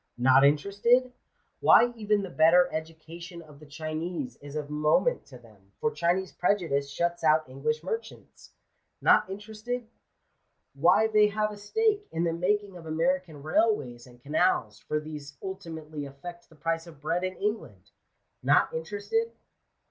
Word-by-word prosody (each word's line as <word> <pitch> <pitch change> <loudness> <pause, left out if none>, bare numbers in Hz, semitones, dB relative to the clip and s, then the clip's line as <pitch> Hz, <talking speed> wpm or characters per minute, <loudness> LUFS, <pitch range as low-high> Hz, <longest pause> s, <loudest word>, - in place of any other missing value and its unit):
Not 130 +2 +5
interested? 200 - +3 0.5
Why 240 0 +6
even 210 -2 0
the 190 - -6
better 165 +3 +5
education 165 +2 -7
of 150 -2 -16
the 150 - -14
Chinese 160 - -4
is 145 0 -10
of 150 -1 -4
moment 155 - +1
to 130 - -12
them, 105 -5 -21
for 225 - 0
Chinese 180 +1 0
prejudice 165 -8 0
shuts 170 +4 -2
out 155 -1 +3
English 150 +4 -2
merchants. 225 +4 -7 0.5
Not - - +4
interested? 220 +4 -5 0.9
Why 170 +10 +4
they 215 -1 +4
have 215 +1 -1
a 210 - -9
stake 415 - 0
in 165 - -1
the 165 -1 +1
making 195 +2 -1
of 165 -2 -11
American 165 -1 -1
railways 145 - 0
and 120 -1 -17
canals, 140 - 0
for 150 - -2
these 150 -2 -9
ultimately 160 -6 -6
affect 170 +6 -10
the 160 - -19
price 165 +2 -2
of 160 -4 -13
bread 165 +5 -1
in 185 0 -3
England. 205 - -4 0.5
Not - - +3
interested 205 - -2
170 Hz, 150 wpm, -28 LUFS, 150-205 Hz, 0.9 s, Why